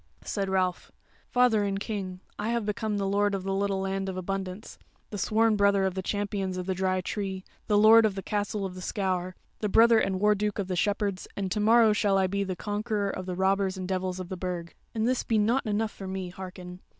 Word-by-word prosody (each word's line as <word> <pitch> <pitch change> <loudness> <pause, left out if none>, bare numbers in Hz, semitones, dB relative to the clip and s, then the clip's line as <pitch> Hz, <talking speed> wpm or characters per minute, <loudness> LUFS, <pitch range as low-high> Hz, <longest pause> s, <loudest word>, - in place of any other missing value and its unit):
Said 195 -2 -2
Ralph: 185 -2 0 0.4
"Father 245 -4 +3
and 195 -1 -1
King, 195 -4 -4 0.2
I 210 +2 -1
have 235 -2 0
become 210 0 -2
the 200 - -1
Lord 200 +1 +1
of 190 - -4
the 195 0 -2
Little 195 0 0
Land 195 0 -2
of 185 - -5
Abundance, 190 +2 -5 0.3
the 205 - -4
sworn 220 +2 +3
brother 200 -1 +3
of 190 - 0
the 190 - -3
Champions 200 -1 -2
of 180 - -3
the 190 - 0
Dry 185 0 0
Tree, 190 0 -4 0.2
the 210 -2 +3
Lord 220 +2 +8
of 210 -3 +1
the 195 - -5
Castle 205 -1 -2
of 185 - -5
the 185 - -9
Scaur, 185 -1 -2 0.2
the 210 - -1
brother 230 +2 +6
and 190 -3 0
Warduke 210 0 +2
of 200 -3 -2
the 185 - -1
Shepherds; 200 +2 -1
and 195 -2 -2
to 210 - 0
morrow 220 +1 +5
shall 205 -2 +2
I 190 - +3
be 200 +2 -1
the 190 -1 -3
Conqueror 205 +1 -2
of 185 0 -6
the 180 - -3
robbers 190 +1 +1
and 185 -1 -4
the 190 - -1
devils 185 0 -2
of 180 -1 -6
the 185 - -4
Burg. 175 -2 -4 0.2
And 220 +1 +1
this 255 0 +1
be 225 - +1
not 225 +4 +2
enough 215 +1 0
for 195 - -8
me, 190 -1 -4
hearken! 180 0 -9
195 Hz, 235 wpm, -28 LUFS, 185-210 Hz, 0.4 s, Lord